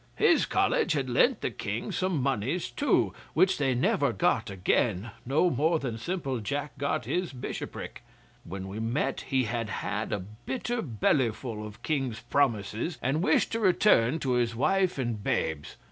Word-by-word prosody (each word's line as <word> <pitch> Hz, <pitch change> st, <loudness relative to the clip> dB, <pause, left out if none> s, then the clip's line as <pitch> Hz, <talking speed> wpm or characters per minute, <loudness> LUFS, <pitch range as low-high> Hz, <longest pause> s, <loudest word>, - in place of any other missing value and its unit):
His -, -, +4 dB
College -, -, +2 dB
had -, -, -1 dB
lent -, -, +3 dB
the -, -, -1 dB
King -, -, -4 dB
some 185 Hz, -7 st, 0 dB
monies 135 Hz, -, -1 dB
too, 290 Hz, -, +2 dB, 0.2 s
which 190 Hz, -2 st, +4 dB
they 135 Hz, -3 st, +2 dB
never 120 Hz, -, +2 dB
got -, -, +1 dB
again, 95 Hz, +2 st, 0 dB, 0.2 s
no 155 Hz, +7 st, +3 dB
more 160 Hz, +3 st, +2 dB
than 125 Hz, -6 st, -4 dB
simple 135 Hz, -3 st, -2 dB
Jack 140 Hz, +6 st, -3 dB
got 140 Hz, -, -1 dB
his 180 Hz, -1 st, -1 dB
bishopric. 125 Hz, -3 st, -6 dB, 0.4 s
When 95 Hz, +2 st, -6 dB
we 100 Hz, +3 st, -6 dB
met 115 Hz, +6 st, -1 dB
he 130 Hz, -2 st, +2 dB
had 115 Hz, -1 st, -2 dB
had 105 Hz, 0 st, -3 dB
a -, -, +1 dB, 0.3 s
bitter 240 Hz, -2 st, -2 dB
bellyful 115 Hz, -, 0 dB
of 105 Hz, -1 st, -10 dB
King's 135 Hz, -7 st, -1 dB
promises, 120 Hz, -, 0 dB
and 140 Hz, +5 st, +1 dB
wished -, -, +2 dB
to 230 Hz, -, -1 dB
return 175 Hz, -, +4 dB
to 130 Hz, -, 0 dB
his 120 Hz, -2 st, +1 dB
wife 185 Hz, +8 st, +2 dB
and 120 Hz, -6 st, -2 dB
babes. 80 Hz, -6 st, -1 dB
130 Hz, 160 wpm, -28 LUFS, 110-165 Hz, 0.4 s, His